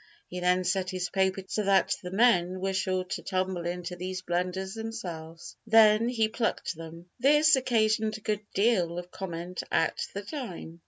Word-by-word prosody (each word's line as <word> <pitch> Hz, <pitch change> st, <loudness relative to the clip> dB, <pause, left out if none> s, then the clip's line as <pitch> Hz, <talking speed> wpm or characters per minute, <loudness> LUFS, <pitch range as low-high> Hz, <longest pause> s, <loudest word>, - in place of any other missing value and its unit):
He 180 Hz, -, -5 dB
then 180 Hz, +1 st, +2 dB
set 185 Hz, 0 st, 0 dB
his 185 Hz, -1 st, -3 dB
paper 190 Hz, 0 st, +1 dB
so 215 Hz, -, -1 dB
that 195 Hz, -1 st, +3 dB
the 180 Hz, -, -6 dB
men 185 Hz, -3 st, +3 dB
were 195 Hz, +1 st, -1 dB
sure 185 Hz, -1 st, 0 dB
to 185 Hz, -, -5 dB
tumble 185 Hz, -2 st, -2 dB
into 180 Hz, 0 st, -4 dB
these 185 Hz, +1 st, -5 dB
blunders 185 Hz, +2 st, -2 dB
themselves; 170 Hz, -8 st, -7 dB
then 220 Hz, +1 st, +6 dB
he 225 Hz, -3 st, +1 dB
plucked 225 Hz, -2 st, -2 dB
them. 165 Hz, +2 st, -11 dB
This 295 Hz, +4 st, +5 dB
occasioned 220 Hz, -4 st, +1 dB
a -, -, -15 dB
good 210 Hz, -1 st, -1 dB
deal 190 Hz, -5 st, +2 dB
of 175 Hz, 0 st, -7 dB
comment 175 Hz, -1 st, -5 dB
at 165 Hz, -, +1 dB
the 200 Hz, -, -4 dB
time. 195 Hz, -, -7 dB
190 Hz, 170 wpm, -28 LUFS, 180-215 Hz, -, then